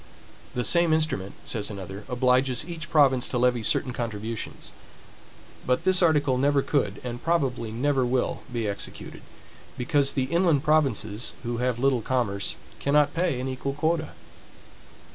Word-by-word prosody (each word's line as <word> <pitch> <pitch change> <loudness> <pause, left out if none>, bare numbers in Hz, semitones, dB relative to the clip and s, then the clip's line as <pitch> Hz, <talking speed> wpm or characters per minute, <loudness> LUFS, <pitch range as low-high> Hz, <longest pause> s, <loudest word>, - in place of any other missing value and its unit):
The 125 - 0
same 170 +3 +4
instrument, 155 -12 -1
says 105 -3 -2
another, 100 0 -7
obliges 125 +1 +2
each 165 -2 -7
province 135 -5 +4
to 125 - -2
levy 125 -1 +2
certain 125 +4 +2
contributions; 115 -2 -5 0.9
but 125 +5 0
this 185 0 +4
article 145 -6 +3
never 140 0 +2
could, 105 -9 0
and 120 -1 -5
probably 135 -9 0
never 135 +3 +1
will, 125 0 0
be 115 -3 -2
executed; 100 -1 -6 0.6
because 140 +2 +1
the 130 - 0
inland 165 0 +2
provinces, 125 -8 +1
who 120 -1 -3
have 125 -1 0
little 130 -1 +2
commerce, 110 - -1 0.2
cannot 145 0 +2
pay 165 -6 0
an 130 - -3
equal 130 +1 -3
quota. 155 +2 -1
130 Hz, 145 wpm, -26 LUFS, 120-150 Hz, 0.9 s, same